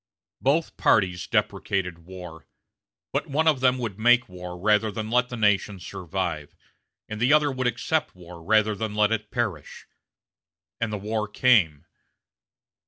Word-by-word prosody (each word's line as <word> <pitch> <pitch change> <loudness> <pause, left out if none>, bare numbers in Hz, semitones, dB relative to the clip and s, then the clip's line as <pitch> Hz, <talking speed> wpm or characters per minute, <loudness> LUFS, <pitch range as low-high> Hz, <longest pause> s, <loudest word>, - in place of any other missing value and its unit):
Both 155 +5 +1
parties 90 -4 +2
deprecated 100 -4 -1
war; 90 -3 -10 0.7
but - - -1
one 155 +3 0
of 150 -4 +4
them 130 0 +3
would 110 -5 -5
make 120 +2 +4
war 90 -1 -8
rather 105 +3 +2
than 110 +1 -5
let 125 +1 +2
the 120 - -6
nation 105 -2 +1
survive; 90 -4 -5 0.5
and 110 0 -6
the 125 +4 +3
other 150 -1 +4
would 130 -1 -1
accept 150 +5 -1
war 85 -1 -12
rather 110 +4 +2
than 105 +1 -4
let 105 0 +3
it 110 -2 -2
perish. 105 - -4 0.9
And 115 -2 -1
the 105 - -2
war 105 +1 -2
came. 95 - +3
105 Hz, 150 wpm, -25 LUFS, 90-120 Hz, 0.9 s, of